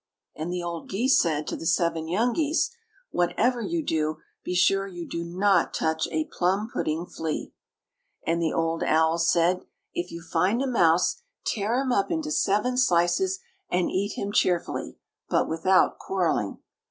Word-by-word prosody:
And 160 +3 -4
the 180 -1 -3
old 170 -1 -5
geese 245 +8 +3
said 155 -2 0
to - - -3
the 165 - -5
seven 165 -1 +1
young 225 +8 +1
geese: 310 - +1 0.4
"Whatever 235 +8 +1
you 330 +5 -2
do, 155 -1 0 0.3
be 180 - -3
sure 195 +2 +3
you 175 -3 -7
do 170 - -4
not 185 +1 +2
touch 160 0 0
a 155 -1 -1
plum 195 +6 0
pudding 160 +3 -1
flea." 160 -3 -4 0.7
And 170 +1 +1
the 160 - +1
old 165 0 0
owls 160 +1 +3
said: 175 +2 +2 0.3
"If 175 +1 -3
you 170 0 -8
find 180 +7 +1
a - - 0
mouse, 180 - +3 0.2
tear 215 +2 0
him 265 -1 0
up 200 -5 +1
into 320 -2 -2
seven 250 0 +1
slices, 255 - +2 0.3
and 180 0 +1
eat 200 +2 -1
him 200 - -3
cheerfully, 180 -4 0 0.3
but - - +2
without 175 +4 +2
quarreling." 175 - -1
180 Hz, 165 wpm, -26 LUFS, 165-210 Hz, 0.7 s, geese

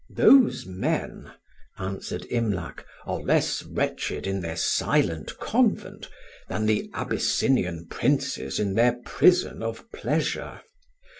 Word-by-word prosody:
"Those 265 - +5
men," 95 0 -3 0.5
answered 95 0 -5
Imlac, 105 -8 -2 0.2
"are - - -3
less - - +1
wretched - - -3
in 95 0 -2
their 80 -2 -4
silent 80 -1 0
convent - - 0 0.4
than 110 - -1
the 110 -1 +1
Abyssinian 90 -10 0
princes 65 -4 -1
in 100 -2 0
their 120 +3 +4
prison 180 -8 +3
of 115 - -5
pleasure. - - -2
100 Hz, 105 wpm, -25 LUFS, 85-115 Hz, 0.5 s, Those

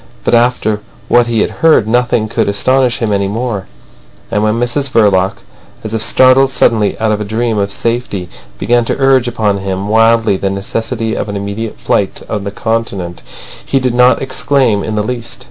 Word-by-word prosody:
But - - 0
after 120 -3 +1 0.3
what 120 -1 +4
he 115 -2 +1
had - - 0
heard 160 -10 +4
nothing 120 -1 +1
could 115 -1 -1
astonish 130 +4 +1
him 105 -2 0
any 100 -1 0
more. 105 -2 -3 0.6
And 105 - 0
when 110 +2 +1
Mrs 130 +3 -1
Verloc, 100 -5 +2 0.5
as 110 0 -5
if 110 - -1
startled 130 +3 +4
suddenly 110 -5 +1
out 110 -1 +1
of 105 0 -1
a - - -1
dream 110 +1 -1
of 100 0 -1
safety, 115 -5 -3 0.3
began 120 - +1
to - - -1
urge 135 -2 +3
upon 105 -4 0
him 95 +1 -4
wildly 115 -2 +3
the 95 - -1
necessity 110 +3 -3
of - - -3
an 100 - -4
immediate 100 +3 -5
flight 100 - -1
on 105 -2 -4
the - - -2
Continent, 100 -6 -3 0.4
he 135 - 0
did 125 -2 -1
not 125 +2 +3
exclaim 130 -5 +1
in 110 - -3
the 105 - 0
least. 120 +1 -5
110 Hz, 185 wpm, -13 LUFS, 100-120 Hz, 0.6 s, what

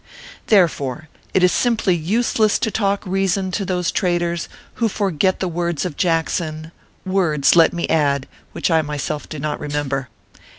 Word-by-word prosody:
Therefore, 155 - +2 0.2
it 185 - +2
is 180 - +5
simply 225 -7 +2
useless 215 +5 +1
to 220 - -1
talk 200 -1 0
reason 190 0 0
to 200 +3 -2
those 180 -2 -1
traitors, 175 -2 -1 0.3
who 225 - +3
forget 190 -3 0
the 190 - -1
words 170 -2 -2
of 175 -5 -4
Jackson 160 -1 -1 0.3
words, 175 -7 +2
let 165 -1 +6
me 175 -1 -2
add, 140 -4 +1 0.2
which - - -1
I 160 -1 +4
myself 150 0 -4
do 155 - -6
not 150 +1 -3
remember. 145 -3 -2
175 Hz, 155 wpm, -20 LUFS, 155-190 Hz, 0.3 s, let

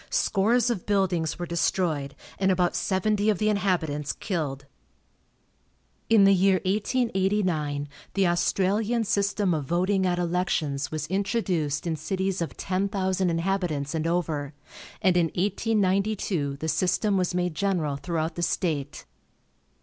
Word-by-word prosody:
Scores 230 +4 +2
of 195 -7 -4
buildings 190 -5 +1
were 175 - -3
destroyed, 165 -4 -1 0.2
and 190 0 +2
about 180 -1 +1
seventy 200 +4 +1
of 210 - +2
the 215 +2 +1
inhabitants 170 -8 0
killed. 145 -8 -3 1.4
In 220 -3 +6
the 195 0 +6
year 190 0 +3
1889 190 - 0 0.3
the 195 -1 +3
Australian 200 +6 +1
system 200 -2 +1
of 150 -3 -2
voting 185 +5 +1
at 175 -1 0
elections 170 -5 -1
was 155 -1 -3
introduced 180 -5 -1
in 165 -2 -1
cities 190 +2 -2
of 170 - -4
ten 190 +1 -1
thousand 190 -2 0
inhabitants 165 -4 -1
and 160 0 -1
over, 155 -4 -2 0.5
and 185 -2 +4
in 175 -2 +3
1892 195 -6 0
the 160 - -4
system 195 +5 +1
was 180 -1 0
made 180 -1 0
general 165 -5 0
throughout 160 +2 -2
the 175 - -5
state. 160 -4 -2
180 Hz, 135 wpm, -26 LUFS, 160-195 Hz, 1.4 s, In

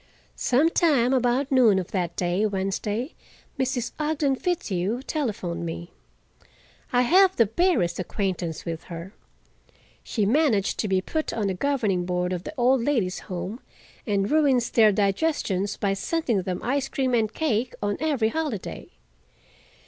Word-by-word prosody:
Some 275 +6 +3
time 270 -8 +3
about 255 +2 +1
noon 240 -7 +5
of 185 -2 -3
that 175 -3 -2
day, 180 +3 0
Wednesday, 205 - -2 0.5
Mrs. 255 -2 -1
Ogden 300 -2 +1
Fitzhugh 235 - -2
telephoned 215 - -3
me. 85 +1 -6 1.0
I 245 0 +3
have 375 +7 +5
the 230 - +5
barest 225 - +1
acquaintance 185 -4 -3
with 165 -2 -5
her—she 190 +4 -8
managed 230 -4 +2
to 215 - 0
be 190 -1 +1
put 315 +10 -2
on 220 -2 -1
the 195 - 0
governing 205 -5 0
board 180 0 -1
of 180 0 -5
the - - -6
Old 250 0 +3
Ladies' 230 -10 0
Home 185 +5 -4 0.5
and 200 -1 0
ruins 275 -6 +3
their 220 -2 +5
digestions 200 - 0
by 200 -1 0
sending 235 - -1
them 180 -1 -4
ice 270 +2 0
cream 260 -2 -1
and 220 -3 +2
cake 245 -4 -1
on 205 0 0
every 280 -8 +1
holiday. 300 - -4
225 Hz, 140 wpm, -25 LUFS, 190-270 Hz, 1.0 s, noon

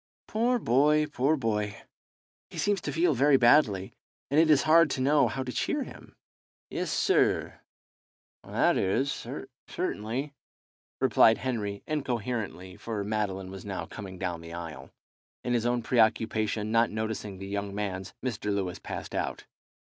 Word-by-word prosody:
"Poor 240 +3 +1
boy, 150 - +3
poor 150 +1 +1
boy! 105 -5 -1 0.7
He - - -10
seems 205 -3 +1
to - - -3
feel 170 0 +2
very 140 +2 +5
badly, 120 -7 +4 0.4
and 145 - +4
it 160 0 +5
is 145 -3 +5
hard 160 0 +6
to - - -2
know 140 0 +4
how 130 +4 -3
to 125 - -5
cheer - - -1
him." - - -13 0.6
"Yes, - - -2
sir - - +2 0.8
that - - +2
is 125 +9 +1 0.6
certainly," 125 +7 -3 0.7
replied 110 - +5
Henry 105 -6 -3
incoherently, 120 - -3
for 110 -3 -4
Madeline 100 -3 -2
was 95 -1 -8
now 100 -2 -4
coming 95 -3 -8
down 90 -3 -3
the 85 0 -9
aisle. 85 -2 -7 0.5
In 125 - -1
his 120 -1 +1
own 120 -1 0
preoccupation 110 -2 +1
not 115 0 +4
noticing 110 -2 -4
the 95 - -7
young 100 0 -4
man's, 95 -2 -4
Mr. 115 -6 -3
Lewis 95 -3 -2
passed - - -7
out. - - -3
110 Hz, 145 wpm, -28 LUFS, 100-135 Hz, 0.8 s, hard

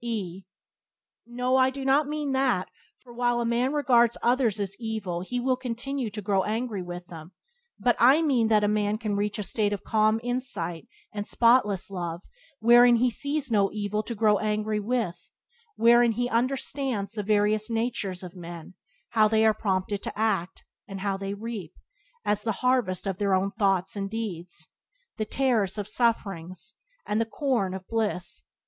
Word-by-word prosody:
E 195 -6 -4 0.8
No, 250 +2 0
I 260 0 +5
do 270 0 -6
not 280 +2 +3
mean 300 -1 -2
that, 265 -8 +1 0.3
for 245 -2 -16
while 240 0 +1
a 235 - -1
man 240 +3 +1
regards 240 -5 +3
others 240 -4 +2
as 195 -1 -2
evil 215 -7 -3
he 245 +7 -3
will 255 +1 +1
continue 255 0 -4
to 210 0 -7
grow 195 -1 +2
angry 220 0 -2
with 175 0 -7
them; 165 +1 -11 0.4
but 245 -1 +2
I 270 +7 +6
mean 255 -7 +2
that 215 -1 +3
a - - +3
man 210 0 +1
can 215 -2 -2
reach 205 +1 -1
a 210 - -3
state 205 +2 0
of 200 - -5
calm 215 0 +2
insight 240 -10 -3 0.3
and 205 0 -4
spotless 220 -6 +3
love 175 -1 -4 0.4
wherein 240 +1 +7
he 245 +1 +2
sees 285 +1 -1
no 200 -3 +3
evil 210 0 -2
to 235 +2 -6
grow 210 -2 +3
angry 215 0 -1
with, 220 -4 -2 0.5
wherein 235 0 +5
he 245 +2 -1
understands 250 -3 -1
the 215 -1 -3
various 210 +1 +1
natures 225 -5 -2
of 180 0 -9
men 170 0 -9 0.2
— - - -41
how 220 -2 +4
they 220 0 +3
are 220 - +5
prompted 195 -1 -1
to - - -6
act, 195 -5 -1 0.2
and 195 -1 -7
how 195 -1 0
they 195 +1 -4
reap, 210 -6 -7 0.5
as 210 0 +1
the 225 - -1
harvest 245 -9 +1
of 195 -2 -3
their 200 -2 +2
own 195 +1 0
thoughts 195 -3 +1
and 195 -1 -3
deeds, 180 -7 -5 0.5
the 215 - -1
tares 225 -6 +1
1 - - 0
of 200 - -8
sufferings 205 -4 -1 0.3
and 210 +2 0
the - - +1
corn 225 -7 -1
of 190 -1 -8
bliss. 215 -5 -1
215 Hz, 180 wpm, -26 LUFS, 195-240 Hz, 0.8 s, wherein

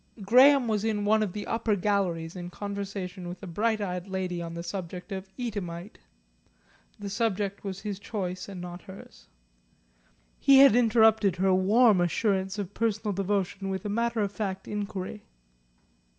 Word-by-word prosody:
Graham 255 +5 +6
was 215 -2 0
in 210 -2 0
one 215 +1 +3
of 210 -4 -1
the 210 - -5
upper 225 -2 0
galleries 180 -4 -1
in 175 -1 -6
conversation 200 -2 -5
with 180 +3 -9
a - - -4
bright 215 +5 0
eyed 180 -1 -3
lady 185 -2 -3
on 170 0 -6
the 170 - -5
subject 180 +1 -6
of 190 0 -5
Eadhamite 200 -7 -5 1.0
the 205 - -7
subject 200 -1 -1
was 195 -1 -5
his 205 -2 -4
choice 185 -3 -4
and 190 -2 -7
not 175 0 -7
hers. 190 0 -13 1.1
He 275 -1 +6
had 275 -4 +8
interrupted 220 -5 +4
her 190 +1 +2
warm 205 +2 +4
assurances 190 +2 0
of 200 -1 -5
personal 215 -2 -1
devotion 195 0 -1
with 190 +2 -4
a - - -2
matter 230 +1 0
of 200 -1 -1
fact 195 -2 -4
inquiry. 205 0 -5
200 Hz, 160 wpm, -28 LUFS, 185-215 Hz, 1.1 s, had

